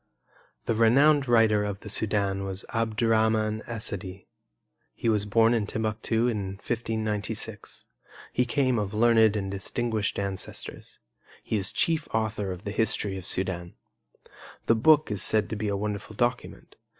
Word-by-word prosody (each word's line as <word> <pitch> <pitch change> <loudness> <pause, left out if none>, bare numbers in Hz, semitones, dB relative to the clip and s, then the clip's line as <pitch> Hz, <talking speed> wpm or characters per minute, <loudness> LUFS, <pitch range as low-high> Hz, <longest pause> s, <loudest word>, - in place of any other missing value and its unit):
The - - +1
renowned 135 +6 +4
writer 110 -3 +4
of 100 -1 -4
the - - -10
Sudan 100 -2 0
was 95 0 -4
Abdurrahman 110 -1 +1
Essadi. 100 -4 -3 0.7
He 115 - -1
was 105 -2 +2
born 115 +2 +4
in 110 -3 0
Timbuctu 110 +2 -1
in 105 -5 -2
1596. 110 -1 -4 0.5
He 125 - +2
came 130 -1 +1
of 105 0 -3
learned 110 -1 +4
and 95 -2 -2
distinguished 110 +2 -2
ancestors. 100 -1 -5 0.5
He - - -2
is 95 -1 +1
chief 160 -2 0
author 110 -3 -1
of 90 +1 -7
the 100 - -4
history 105 -2 0
of 95 -2 -7
Sudan. 90 -2 -2 0.9
The - - +4
book 150 +4 +4
is 100 -3 -1
said 110 -1 +1
to - - -1
be 105 0 -3
a 100 -1 -1
wonderful 105 +1 -4
document. 120 +2 -3
110 Hz, 145 wpm, -27 LUFS, 100-115 Hz, 0.9 s, renowned